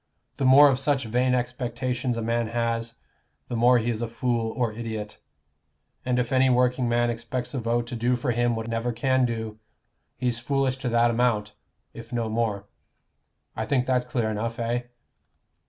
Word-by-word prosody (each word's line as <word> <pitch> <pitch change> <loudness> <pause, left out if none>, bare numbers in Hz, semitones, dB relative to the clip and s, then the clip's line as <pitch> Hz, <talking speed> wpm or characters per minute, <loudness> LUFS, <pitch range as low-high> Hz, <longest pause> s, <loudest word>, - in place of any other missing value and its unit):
The 135 - 0
more 140 +3 +8
of 135 -2 +2
such 135 -2 0
vain 125 +3 +1
expectations 125 0 -2
a 115 - -2
man 115 0 0
has, 115 0 -2 0.5
the 120 - -3
more 120 +2 +5
he 120 +1 0
is 115 0 -4
a 120 - -1
fool 115 0 -1
or 120 -4 -1
idiot. 110 -2 -6 0.8
And 125 -1 0
if 125 -1 -1
any 130 0 +4
working 125 0 +2
man 120 0 +2
expects 120 +2 -4
a 135 - -1
vote 120 +1 0
to 120 +1 -6
do 120 +2 +1
for 125 +1 -1
him 120 0 +1
what 110 0 -4
it 115 - -5
never 115 +2 -1
can 130 +2 +2
do, 110 -2 -5 0.6
he's 125 -2 0
foolish 135 +1 0
to 130 -1 -3
that 120 0 +3
amount, 115 -3 +1 0.4
if 115 +1 -11
no 115 -2 -1
more. 110 -3 -1 0.9
I - - -3
think 130 -3 +1
that's 125 -1 +1
clear 115 -3 -1
enough, 115 +2 -3
eh?" 120 +1 -1
120 Hz, 185 wpm, -25 LUFS, 115-125 Hz, 0.9 s, more